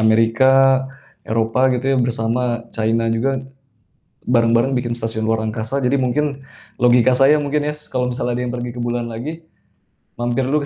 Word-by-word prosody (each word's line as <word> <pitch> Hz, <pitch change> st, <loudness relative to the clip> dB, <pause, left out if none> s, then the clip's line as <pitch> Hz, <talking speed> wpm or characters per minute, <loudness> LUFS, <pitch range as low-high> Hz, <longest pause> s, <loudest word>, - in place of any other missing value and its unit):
Amerika, 130 Hz, +4 st, +4 dB, 0.4 s
Eropa 115 Hz, +4 st, +1 dB
gitu 125 Hz, 0 st, -1 dB
ya -, -, +2 dB
bersama 120 Hz, 0 st, -1 dB
China 115 Hz, +1 st, 0 dB
juga, 135 Hz, +4 st, 0 dB, 0.9 s
bareng-bareng 120 Hz, +2 st, +2 dB
bikin 125 Hz, -1 st, -2 dB
stasiun 115 Hz, -1 st, -3 dB
luar 110 Hz, 0 st, 0 dB
angkasa. 110 Hz, +4 st, -3 dB
Jadi 130 Hz, 0 st, 0 dB
mungkin 140 Hz, +2 st, -1 dB, 0.4 s
logika 125 Hz, +1 st, +5 dB
saya 135 Hz, +4 st, +5 dB
mungkin 150 Hz, +1 st, -1 dB
ya -, -, -4 dB
s 150 Hz, 0 st, -14 dB
kalau 125 Hz, -1 st, -2 dB
misalnya 125 Hz, -1 st, -2 dB
ada 125 Hz, -, -2 dB
yang 125 Hz, 0 st, -3 dB
pergi 120 Hz, 0 st, -4 dB
ke 120 Hz, -, -6 dB
bulan 120 Hz, 0 st, -2 dB
lagi, 150 Hz, +9 st, -7 dB, 0.7 s
mampir 120 Hz, +2 st, 0 dB
dulu 140 Hz, +4 st, +1 dB
125 Hz, 165 wpm, -19 LUFS, 115-135 Hz, 0.9 s, logika